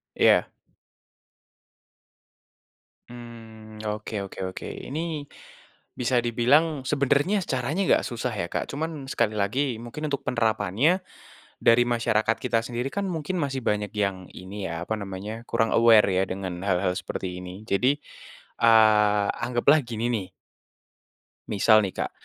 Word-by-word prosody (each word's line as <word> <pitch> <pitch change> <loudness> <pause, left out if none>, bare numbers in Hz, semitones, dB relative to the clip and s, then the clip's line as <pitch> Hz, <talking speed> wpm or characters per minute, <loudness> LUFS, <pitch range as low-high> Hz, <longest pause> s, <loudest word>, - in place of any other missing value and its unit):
Iya. - - +4 2.6
Mmm, 110 -2 -11
oke 105 +1 -4
oke 95 - -11
oke. 95 - -8
Ini 155 0 -5 0.7
bisa 125 0 +2
dibilang 130 +6 +2
sebenarnya 145 +8 +2
caranya 135 +8 -1
nggak - - +4
susah 120 0 -3
ya, 85 -5 -3
Kak, - - -2
cuman 155 -2 -4
sekali 115 -3 +1
lagi, 120 +5 0
mungkin 150 +6 -5
untuk 140 - -1
penerapannnya 115 - +1 0.6
dari 115 +1 +5
masyarakat 115 -2 +1
kita 120 -3 +1
sendiri 120 +2 -3
kan 200 0 -1
mungkin 165 +1 -3
masih 135 -3 -2
banyak 105 -1 0
yang 100 -3 -1
ini, 95 +2 -7
ya, 85 0 -4
apa 110 - -1
namanya, 100 +4 -6
kurang 115 -1 +1
aware, 115 -2 +6
ya, 95 0 +2
dengan 95 -2 -5
hal-hal 95 -1 +1
seperti 90 -1 -5
ini, 90 +2 -9
jadi, 130 +9 +2 0.6
eee, 105 -3 +5
anggaplah 120 +5 +2
gini 115 0 -3
nih 105 -6 -2 1.2
misal 110 +1 +4
nih, 95 - -5
Kak, - - -3
115 Hz, 130 wpm, -25 LUFS, 105-130 Hz, 2.6 s, aware